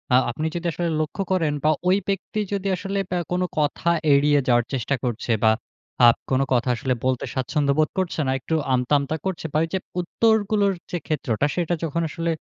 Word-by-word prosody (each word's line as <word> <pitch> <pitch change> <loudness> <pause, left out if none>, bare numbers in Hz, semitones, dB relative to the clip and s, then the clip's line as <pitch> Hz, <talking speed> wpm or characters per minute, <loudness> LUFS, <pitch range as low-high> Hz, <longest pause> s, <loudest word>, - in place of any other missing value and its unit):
আ - - +8
আপনি 155 +6 -4
যদি 170 0 -4
আসলে 170 +2 -2
লক্ষ্য 155 +6 -2
করেন 165 -5 +2
বা, 155 - +4 0.2
ওই 190 +2 +5
ব্যক্তি 195 +2 -2
যদি 200 0 -2
আসলে 195 +1 -3
বে 180 - -1
কোনো 180 +1 +1
কথা 150 +3 0 0.2
এড়িয়ে 145 +1 +4
যাওয়ার 120 -1 +3
চেষ্টা 135 +2 0
করছে 120 -1 -2
বা 110 - +6 0.6
আব 120 - +6 0.2
কোনো 130 +1 +3
কথা 125 +1 +1
আসলে 130 +1 -1
বলতে 130 -1 0
স্বাচ্ছন্দ্য 140 +2 0
বোধ 155 - +3
করছে 175 -3 -2
না। - - +2
একটু 160 +5 -2 0.2
আমতা, 125 +3 +1
আমতা 140 +3 -2
করছে 185 -4 -3
বা - - +2
ওইযে 165 +4 -2 0.2
উত্তরগুলোর 205 0 +2 0.2
যে 175 - -1
ক্ষেত্রটা 140 -4 0
সেটা 175 -1 0
যখন 165 +1 -1
আসলে 165 +1 -2
155 Hz, 195 wpm, -23 LUFS, 130-180 Hz, 0.6 s, আ